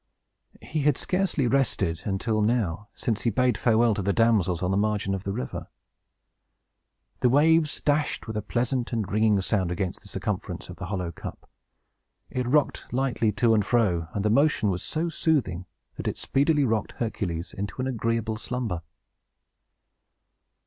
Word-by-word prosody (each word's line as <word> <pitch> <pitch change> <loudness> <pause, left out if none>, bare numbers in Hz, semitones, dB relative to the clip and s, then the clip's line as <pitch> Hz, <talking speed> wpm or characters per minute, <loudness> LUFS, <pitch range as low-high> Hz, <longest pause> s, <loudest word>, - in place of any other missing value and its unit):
He 155 - -3
had 145 -1 +3
scarcely 185 -7 0
rested, 115 -10 +1
until 110 +2 0
now, 105 -4 0
since 110 -3 -1
he 120 - +2
bade 125 +1 +2
farewell 115 +1 +3
to 100 - -2
the 100 +1 +1
damsels 100 -6 +2
on 90 - +1
the - - +1
margin 105 -1 +1
of 95 0 -4
the 100 - -1
river. 65 -10 -4 1.5
The 125 - +4
waves 155 +3 +4
dashed, 145 0 0
with 110 - -6
a 105 - -1
pleasant 120 +3 -1
and 110 -4 -1
ringing 105 -1 +3
sound, 95 -2 0
against 90 +1 -3
the - - -14
circumference - - -4
of - - -8
the - - -6
hollow 90 -4 -3
cup; - - -9 0.8
it 125 -1 -2
rocked 145 +3 +1
lightly 120 -3 +1
to 115 +3 +3
and 105 -2 +3
fro, 95 -7 +1
and 100 0 -1
the 105 - +3
motion 135 -5 +3
was 90 -1 -3
so 160 - -2
soothing 115 - 0 0.3
that - - -4
it - - -2
speedily 145 +1 +2
rocked 110 -3 0
Hercules 90 -7 -3
into 100 +5 -5
an 130 - 0
agreeable 115 -3 -1
slumber. 115 -7 -3
110 Hz, 165 wpm, -26 LUFS, 100-130 Hz, 1.5 s, The